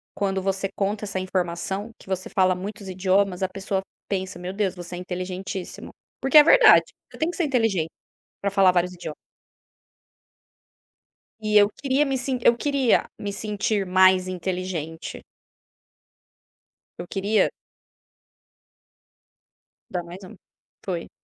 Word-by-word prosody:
quando 195 -2 -1
você 195 0 -1
conta 205 +1 -1
essa 195 -2 -3
informação 185 +3 -3
que - - -17
você 185 -1 -3
fala 185 -1 +3
muitos 200 +1 -7
idiomas, 190 0 +1
a 190 - 0
pessoa 195 0 -2 0.3
pensa: 190 -2 -3
"Meu 180 +1 -5
Deus, 195 -2 -1
você 175 0 -8
é 175 - -6
inteligentíssimo", 185 +1 -6 0.3
porque 270 +3 +5
é 300 - +11
verdade, - - +7 0.3
você - - -12
tem 320 +2 0
que 355 - -5
ser 345 - +1
inteligente 225 - +1 0.5
pra 200 - +1
falar 190 -2 +5
vários 180 0 +1
idio 170 -4 -7 2.3
E 215 0 +3
eu 205 0 +6
queria 275 +5 0
me 270 -1 -1
sin 255 0 -2
eu 235 - +5
queria 275 -2 +1
me 205 -1 -3
sentir 210 -1 -1
mais 185 0 +4
inteligente. 180 -3 -4 1.7
Eu 175 - -7
queria 205 +3 +1 2.4
Dá 180 -2 -3
mais 180 +3 -10
um, 220 +3 -11 0.5
foi. 175 -3 -4
190 Hz, 135 wpm, -24 LUFS, 185-210 Hz, 2.4 s, é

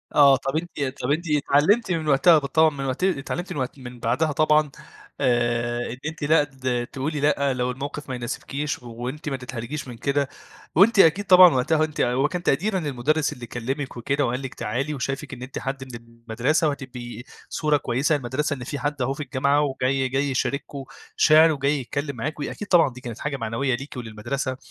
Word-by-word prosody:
آه، 140 -2 +7
طَب 135 +3 -4
أنتِ 170 +1 -4 0.2
طَب 125 +2 -1
أنتِ 160 +4 0
اتعلمتِ 150 +9 +3
من 160 -3 -1
وقتها 150 +4 +6
بالطبع 155 +3 +3
مت 135 +1 -4
اتعلمتِ 175 0 -1
من - - -4
وقت 130 +2 -4
من 125 -1 -10
بعدها 130 +8 +1
طبعًا 150 0 +3 0.5
آآ، 120 -2 0
إن 125 - -7
أنتِ 160 -1 -5
لأ 150 +1 +4
د 130 -3 -3
تقولي 145 +3 -2
لأ 140 -1 +2
لو 125 0 -1
الموقِف 140 +2 -6
ما 130 - -2
يناسبكيش 135 +4 -4
وأنتِ 125 +6 -6
ما 135 - -2
تتحرجيش 125 +3 -6
من 120 -2 -8
كده، 140 +2 0 0.5
وأنتِ 200 +6 +5
أكيد 185 +3 +5
طبعًا 180 -2 +8
وقتها 155 +5 +2
أنتِ 155 -1 -2
هو 130 +4 +2
كان 180 +2 -4
تقديرًا 190 +7 +1
للمدُرس 150 0 0
اللي 120 -1 -9
كلمِك 130 +4 -4
وكده 140 +4 0
وقال 125 +2 -2
لِك 135 -2 -6
تعالي 130 +7 -3
وشايفك 135 0 -4
إن 125 - -9
أنتِ 130 +1 -6
حد 135 0 -4
من 130 -2 -9
المَدرسة 115 +6 -1
وهتبقي 125 -4 -6 0.3
صورة 150 -1 +1
كويسة 140 +4 0
للمدرسة، 145 +3 -2
إن 130 -3 -6
في 140 +3 -5
حد 145 -1 -2
أهو 130 +2 0
في 150 - -5
الجامعة 140 +2 +1
وجاي 135 -1 0
جاي 135 +2 0
يشاركم 140 +1 -2 0.3
شِعر 160 +1 +6
وجاي 145 0 0
يتكلم 140 +2 -4
معاكم 145 +5 -4
أكيد 205 - -7
طبعًا 175 -6 +5
دي 125 - -11
كانت 120 -2 -7
حاجة 150 -2 -3
معنوية 120 +3 -1
ليكِ 135 +2 -8
وللمدرسة، 125 +3 -4
140 Hz, 190 wpm, -24 LUFS, 125-150 Hz, 0.5 s, طبعًا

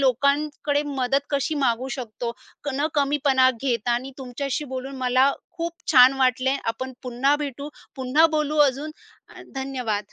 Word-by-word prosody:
लोकांकडे 285 +2 +1
मदत 270 -1 0
कशी 285 +2 0
मागू 260 -3 0
शकतो, 235 -1 -5 0.3
क - - -3
न 290 +3 +1
कमीपणा 280 -2 +3
घेता 240 -3 0
आणि 255 +3 -2
तुमच्याशी 270 +2 -3
बोलून 265 0 -6
मला 255 +2 +3 0.2
खूप 335 -1 -3 0.2
छान 255 -1 +8
वाटले. 260 +1 +2
आपण 260 +3 -3
पुन्हा 255 +3 +1
भेटू, 285 -1 -5 0.3
पुन्हा 265 +5 +4
बोलू 300 0 0
अजून 280 +4 -5 0.4
अ, - - -11
धन्यवाद. 250 -7 -3
265 Hz, 140 wpm, -24 LUFS, 255-285 Hz, 0.4 s, छान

